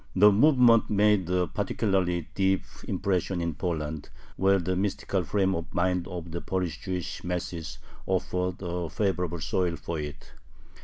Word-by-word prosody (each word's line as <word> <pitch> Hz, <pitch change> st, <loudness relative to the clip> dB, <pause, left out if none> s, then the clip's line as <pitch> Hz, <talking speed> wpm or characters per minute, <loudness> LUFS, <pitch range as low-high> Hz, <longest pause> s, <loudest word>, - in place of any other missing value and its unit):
The 105 Hz, +2 st, +7 dB
movement 120 Hz, -1 st, +5 dB
made 105 Hz, -3 st, +3 dB
a 90 Hz, 0 st, +2 dB
particularly 95 Hz, -4 st, 0 dB
deep 95 Hz, 0 st, +2 dB, 0.2 s
impression 95 Hz, -1 st, 0 dB
in 85 Hz, -1 st, -1 dB
Poland, 80 Hz, -3 st, -3 dB, 0.3 s
where 95 Hz, +1 st, +4 dB
the 95 Hz, 0 st, -1 dB
mystical 95 Hz, 0 st, -1 dB
frame 95 Hz, +2 st, +1 dB
of 85 Hz, -1 st, -4 dB
mind 90 Hz, 0 st, +1 dB
of 85 Hz, -2 st, -6 dB
the 85 Hz, -, -4 dB
Polish 90 Hz, -4 st, -2 dB
Jewish 90 Hz, -2 st, -4 dB
masses 85 Hz, -7 st, -4 dB, 0.3 s
offered 90 Hz, -1 st, 0 dB
a 90 Hz, -1 st, -3 dB
favorable 90 Hz, -4 st, -1 dB
soil 90 Hz, +2 st, 0 dB
for 85 Hz, -1 st, -4 dB
it. 75 Hz, 0 st, -7 dB
90 Hz, 145 wpm, -27 LUFS, 85-95 Hz, 0.3 s, The